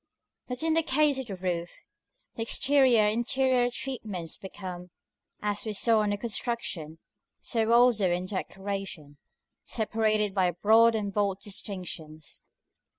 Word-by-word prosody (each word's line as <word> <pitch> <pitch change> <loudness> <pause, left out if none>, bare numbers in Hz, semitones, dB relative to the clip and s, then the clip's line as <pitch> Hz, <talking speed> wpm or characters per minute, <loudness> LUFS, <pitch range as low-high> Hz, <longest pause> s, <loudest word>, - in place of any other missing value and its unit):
But 250 +3 -3
in 325 0 +2
the 325 - +4
case 295 -2 +2
of 265 - -5
the 200 - -5
roof, 175 -2 -2 0.6
the - - -6
exterior 260 0 +4
and 210 +1 +1
interior 255 0 +2
treatments 215 - -5
become, 185 -2 -8 0.5
as 205 0 -1
we 215 - -3
saw 220 +2 +3
in 205 -1 0
construction, 210 -8 -3 0.4
so 225 -1 0
also 235 -5 +5
in 175 +1 -1
decoration, 190 -6 -5 0.5
separated 215 -2 0
by 185 -2 +2
broad 220 +6 +4
and 205 -2 -2
bold 200 -2 0
distinctions. 180 -7 -6
210 Hz, 130 wpm, -28 LUFS, 185-235 Hz, 0.6 s, also